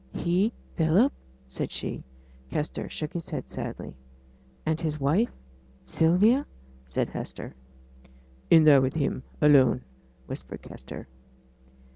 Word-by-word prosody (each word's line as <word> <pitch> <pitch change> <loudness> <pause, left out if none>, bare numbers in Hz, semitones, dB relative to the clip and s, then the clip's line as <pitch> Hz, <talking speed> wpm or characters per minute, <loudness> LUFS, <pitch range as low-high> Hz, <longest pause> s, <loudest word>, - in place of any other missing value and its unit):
'He? 185 +6 +2 0.3
Philip?' 175 - +4 0.3
said 65 - -4
she. - - -4 0.5
Kester 150 - -3
shook 155 -1 -5
his 170 -2 -5
head - - -4
sadly. - - -5 0.7
'And 160 +1 0
his 155 -2 -2
wife 160 - +2 0.5
Sylvia?' 180 - +3 0.4
said 65 - -1
Hester. - - -7 1.0
'In 165 -1 +8
there 145 -3 +8
with 130 +2 0
him, 140 -4 0 0.2
alone,' 135 - +5 0.4
whispered - - -7
Kester. 65 - -9
160 Hz, 110 wpm, -27 LUFS, 140-175 Hz, 1.0 s, In